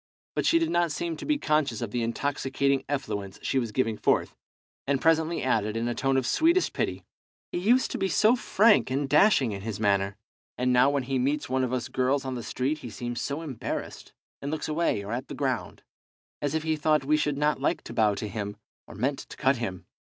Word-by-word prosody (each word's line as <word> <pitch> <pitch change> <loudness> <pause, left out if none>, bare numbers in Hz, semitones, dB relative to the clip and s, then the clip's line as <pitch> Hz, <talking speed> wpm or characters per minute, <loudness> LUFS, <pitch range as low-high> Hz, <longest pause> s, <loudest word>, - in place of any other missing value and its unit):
But - - 0
she 335 - +5
did 330 -1 0
not 175 -2 +2
seem 165 +2 -3
to - - -7
be 300 -1 +2
conscious 150 - +1
of 115 -4 -4
the 120 - -1
intoxicating 135 +3 0
effluence 100 -9 -3
she 135 - +1
was 115 -4 -3
giving 115 -2 0
forth, - - +1 0.5
and 140 -1 +2
presently 165 +2 +2
added, 110 -4 0
in 115 +1 -1
a 120 - 0
tone 135 +2 +1
of 130 - +1
sweetest 335 - +3
pity - - -2 0.5
"He - - -2
used 240 +8 +3
to - - -3
be 195 - +1
so 215 +5 +4
frank 220 - +4
and 135 +2 -1
dashing 145 - +4
in 100 -1 -5
his 105 0 -5
manner, 100 -1 +1 0.4
and 125 0 +1
now 125 +2 +5
when 140 -2 0
he 130 +1 -1
meets 140 +3 0
one 130 0 +1
of 125 - -1
us 130 -2 -2
girls 130 +1 0
on 130 - -3
the 120 - -4
street 135 +6 -2
he 125 - -8
seems 120 +1 -5
so 145 +3 -3
embarrassed, 135 -8 -5 0.3
and 140 - -4
looks 155 0 -3
away 155 -9 0
or 105 - -6
at 125 +2 -3
the - - -7
ground, - - -2 0.6
as 145 +1 -1
if 160 - -1
he 160 0 +1
thought 150 -2 +1
we 150 +2 +3
should 150 -2 0
not 150 -1 +1
like 145 - 0
to - - -8
bow 105 -2 +3
to 105 - -4
him, 105 0 -5 0.3
or - - -11
meant 135 +7 -1
to - - -10
cut 135 0 +2
him. 95 -6 -5
135 Hz, 230 wpm, -27 LUFS, 120-155 Hz, 0.6 s, she